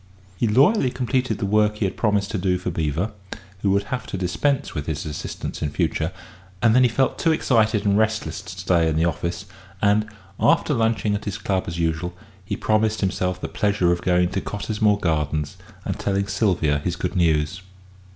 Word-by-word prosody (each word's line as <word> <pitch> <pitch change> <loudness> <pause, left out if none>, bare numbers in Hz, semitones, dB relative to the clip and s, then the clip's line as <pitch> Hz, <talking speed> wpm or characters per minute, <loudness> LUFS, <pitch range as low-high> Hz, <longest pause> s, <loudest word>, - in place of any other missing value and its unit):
He 115 - 0
loyally 135 - +4
completed 125 -2 -1
the 100 - -2
work 105 +1 +2
he 105 - 0
had 95 - -2
promised 105 -2 +1
to 105 - -1
do 90 0 +1
for 90 0 -3
Beevor, 80 +5 -1 0.5
who 100 - +1
would 100 +1 +2
have 125 - -3
to - - -4
dispense 135 +10 0
with 75 0 -4
his 75 -3 -3
assistance 75 -2 -5
in 75 - 0
future, - - -1 0.5
and 115 0 +4
then 125 - +5
he 125 - +5
felt 130 +3 0
too 165 - +3
excited 110 -8 +2
and 100 -1 +3
restless 110 -7 0
to 95 - -12
stay 85 -2 +2
in 80 - -1
the 80 +2 +2
office, 85 0 -2 0.3
and, 105 +2 +2 0.3
after - - +3
lunching 110 -2 +1
at 105 - -3
his 100 0 -3
club 95 -2 -1
as 85 - -4
usual, 85 +1 -1 0.3
he 95 - -4
promised 110 0 +1
himself 90 -1 -1
the - - -4
pleasure 100 -5 +1
of 85 0 0
going 90 -1 +2
to 95 +1 -2
Cottesmore 105 0 0
Gardens 75 -3 -1 0.3
and - - -3
telling 100 0 0
Sylvia 85 -9 +1
his 85 +4 -2
good 90 +1 -3
news. 85 0 +1
100 Hz, 195 wpm, -23 LUFS, 85-110 Hz, 0.5 s, then